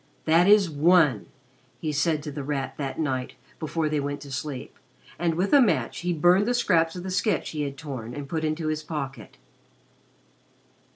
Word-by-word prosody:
"That 165 +3 +4
is 205 -2 +6
one!" 155 - +3 0.5
he 155 - -3
said 150 +1 0
to 150 - -5
The 145 0 -5
Rat 135 -1 -3
that 135 -2 -4
night 130 -5 -2 0.2
before 160 0 -1
they 150 -1 0
went 145 0 -3
to 140 - -10
sleep, 135 0 -6 0.4
and 170 -1 +1
with 185 - 0
a 285 - +8
match 230 - +1
he 180 0 -1
burned 175 +5 +4
the 245 - +1
scraps 165 -8 +2
of 180 - -6
the 190 - -4
sketch 210 +4 0
he 150 - -3
had 140 -1 -4
torn 130 -5 -6
and 145 -1 -6
put 160 +1 -3
into 155 0 -1
his 155 0 -2
pocket. 145 -4 -6
155 Hz, 185 wpm, -26 LUFS, 145-175 Hz, 0.5 s, a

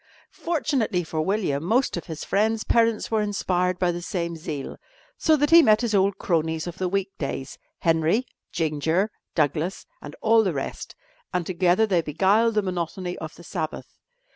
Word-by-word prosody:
Fortunately 275 - 0
for 160 -1 -3
William, 160 -5 0
most 240 +9 +1
of 175 - -5
his 160 -2 -6
friends' 220 +2 +1
parents 230 -1 +2
were 220 -1 +2
inspired 185 -3 0
by 180 -1 +1
the 175 0 -5
same 170 -1 -3
zeal, 155 -4 -6 0.4
so 315 - +3
that 295 +1 +1
he 335 0 +10
met 215 -6 +4
his 235 -3 -1
old 195 0 +2
cronies 160 -2 -1
of 175 0 -7
the 185 -1 0
week 195 +1 -2
days 135 -2 -5 0.2
Henry, 165 +8 +2 0.3
Ginger, 160 +6 0 0.2
Douglas 155 +4 0 0.2
and 145 +1 -9
all 225 0 +4
the 185 -5 0
rest 135 - -5 0.4
and 180 -2 -1
together 185 +3 +2
they 185 -5 +2
beguiled 200 +9 +2
the 210 - +2
monotony 180 0 -3
of 155 0 -7
the 175 - -14
Sabbath. 160 -3 -5
180 Hz, 170 wpm, -24 LUFS, 165-215 Hz, 0.4 s, he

